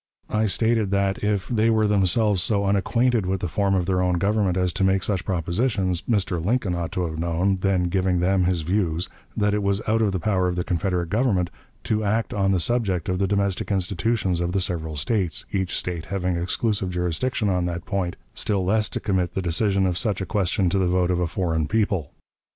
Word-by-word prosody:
I 110 0 +2
stated 110 0 +1
that, 100 0 0
if 105 -2 0
they 115 -2 +2
were 110 -1 +3
themselves 105 0 +2
so 100 +1 +1
unacquainted 110 +2 +1
with 95 0 -1
the 90 - -1
form 95 +5 +1
of 90 -2 +1
their 90 0 +1
own 90 -1 +1
government 100 -1 +1
as 90 -1 +1
to - - -1
make 95 0 +2
such 95 -4 -1
propositions, 95 +1 0
Mr. 95 -6 0
Lincoln 105 -1 0
ought 85 -1 -3
to 90 - -1
have 80 -1 -5
known, 85 +4 +1
then 95 -1 +1
giving 90 0 +1
them 90 +1 +2
his 90 -2 +1
views, 85 -1 -1 0.3
that 105 0 +2
it 105 - 0
was 100 0 +1
out 110 +1 +2
of 105 -3 +2
the 95 - -2
power 95 0 +1
of 90 - -1
the 90 - -1
Confederate 90 -1 -1
Government 100 -5 +1 0.3
to 110 0 0
act 110 +3 0
on 95 -1 +1
the 95 - +2
subject 95 -4 0
of 90 0 0
the 100 - +1
domestic 100 0 -1
institutions 95 0 0
of 85 +1 -1
the 95 - +1
several 80 -4 -2
States, 90 +1 -1
each 95 -2 -1
State 85 -3 -3
having 90 -2 -1
exclusive 95 +3 -1
jurisdiction 90 +7 -1
on 90 -2 +1
that 85 -1 -4
point, 90 -3 -2 0.2
still 100 -3 0
less 105 +2 +2
to - - -4
commit 95 -4 -1
the - - 0
decision 95 +3 +1
of 90 -1 0
such 105 -5 -1
a 95 - -2
question 95 -2 0
to 100 - +1
the 95 - +2
vote 90 0 +2
of 90 - 0
a 90 - +1
foreign 80 -2 -1
people. 100 -8 0
95 Hz, 215 wpm, -24 LUFS, 90-105 Hz, 0.3 s, were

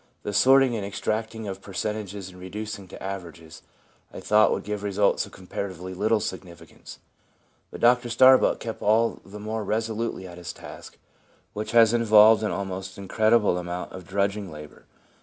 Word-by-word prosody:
The 105 - -4
sorting 130 +4 +5
and 105 - -3
extract 110 +3 -3
ing 110 -1 -6
of 95 0 -6
percentages 100 -1 -5
and 90 0 -14
reducing 100 +1 -7
to - - -11
averages, 85 -4 -8 0.5
I - - -8
thought, 105 0 +4
would - - -2
give 105 -1 -4
results 100 0 +1
of - - -16
comparatively 95 -1 -6
little 105 +4 +1
significance. 90 -4 -8 0.7
But - - -10
Dr 120 0 +4
Starbuck 130 +2 +5
kept 115 -1 -6
all 115 +2 +2
the 105 +2 -11
more 110 +1 -4
resolutely 110 -1 -2
at 90 0 -11
his 90 0 -7
task, - - -12 0.6
which 105 +2 -5
has 115 -1 +6
involved 110 -2 +6
an 105 - -1
almost 95 -1 -5
incredible 105 0 +2
amount 90 0 -5
of 95 -2 -10
drudging 100 0 -1
labour. 75 0 -12
105 Hz, 160 wpm, -25 LUFS, 95-110 Hz, 0.7 s, has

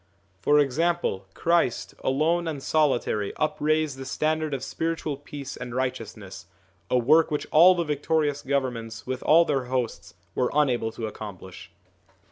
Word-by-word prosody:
For 145 +11 +3
example, 145 - +1
Christ, 170 -8 +1
alone 160 +6 +1
and 145 -4 -4
solitary, 125 -9 +1
upraised 155 -1 0
the 135 - -6
standard 155 +2 -1
of 135 -2 -3
spiritual 165 -2 -2
peace 140 -1 -8
and 125 -1 -7
righteousness, 105 -7 -4 0.4
a 125 - +3
work 150 +7 +4
which 150 - -2
all 175 +4 +7
the 175 - 0
victorious 150 -1 0
governments 125 -5 -3
with 130 0 -4
all 165 +2 +5
their 140 -5 0
hosts 125 -2 -3 0.2
were 125 - +1
unable 125 -6 +2
to 115 0 -5
accomplish. 95 -4 -9
140 Hz, 140 wpm, -26 LUFS, 120-155 Hz, 0.4 s, all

